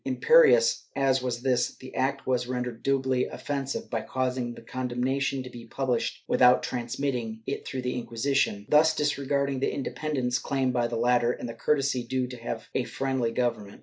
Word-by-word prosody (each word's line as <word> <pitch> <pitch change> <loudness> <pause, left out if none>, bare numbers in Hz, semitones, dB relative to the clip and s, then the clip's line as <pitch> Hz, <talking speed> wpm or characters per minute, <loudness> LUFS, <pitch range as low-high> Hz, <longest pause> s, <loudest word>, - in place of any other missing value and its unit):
^ - - -45
Imperious 475 - +5
as 135 -1 +2
was 125 -1 -3
this, 130 -2 +1
the 130 - -11
act 135 +1 -1
was 125 -1 0
rendered 125 -2 -3
doubly 130 -2 +1
offensive 140 -1 -4
by 115 -2 -1
causing 125 -1 -2
the - - -11
condemnation 130 +2 -1
to 130 - -8
be 120 -1 -10
published 125 -1 -2
without 125 0 +5
transmitting 120 -2 -3
it 140 - -4
through 130 -1 -4
the 125 0 -1
Inquisition, 120 -3 0
thus 155 +2 +5
disregarding 140 -2 0
the 135 - 0
independence 135 -3 -2
claimed 135 -1 0
by 120 -1 +1
the - - -3
latter 120 0 +3
and - - -6
the 115 - -5
courtesy 135 +1 +1
due 130 +1 -1
to 120 -2 -5
a 130 - +1
friendly 130 -1 -1
government. 115 -4 -2
130 Hz, 175 wpm, -27 LUFS, 120-135 Hz, -, Imperious